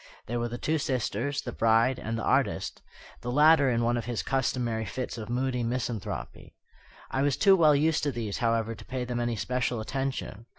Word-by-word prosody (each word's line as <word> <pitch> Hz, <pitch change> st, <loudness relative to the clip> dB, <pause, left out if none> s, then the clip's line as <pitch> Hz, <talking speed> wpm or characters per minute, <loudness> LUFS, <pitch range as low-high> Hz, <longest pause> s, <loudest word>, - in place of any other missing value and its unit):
There 120 Hz, +1 st, -2 dB
were 120 Hz, -, -1 dB
the 120 Hz, +1 st, -5 dB
two 155 Hz, +5 st, 0 dB
sisters, 130 Hz, 0 st, -1 dB
the 120 Hz, -, -4 dB
bride, 115 Hz, +3 st, +3 dB
and 115 Hz, +1 st, -3 dB
the 115 Hz, -, -4 dB
artist -, -, 0 dB, 0.4 s
the 120 Hz, -, -3 dB
latter 150 Hz, 0 st, +6 dB
in 120 Hz, -1 st, +1 dB
one 120 Hz, +1 st, +2 dB
of 120 Hz, -, -3 dB
his 120 Hz, -2 st, -2 dB
customary 120 Hz, -4 st, 0 dB
fits 125 Hz, +4 st, -4 dB
of 110 Hz, -2 st, -7 dB
moody 125 Hz, 0 st, -1 dB
misanthropy. 120 Hz, -3 st, -4 dB, 0.6 s
I 135 Hz, -, 0 dB
was 140 Hz, -1 st, +1 dB
too 195 Hz, -2 st, +6 dB
well 155 Hz, -5 st, +5 dB
used 155 Hz, +2 st, +2 dB
to 145 Hz, -, +1 dB
these, 115 Hz, -5 st, -4 dB
however, 115 Hz, -1 st, +1 dB
to -, -, -11 dB
pay 130 Hz, -1 st, -4 dB
them 120 Hz, -1 st, -3 dB
any 120 Hz, -1 st, -1 dB
special 125 Hz, +1 st, -1 dB
attention. 130 Hz, -2 st, -4 dB
120 Hz, 200 wpm, -28 LUFS, 115-135 Hz, 0.6 s, latter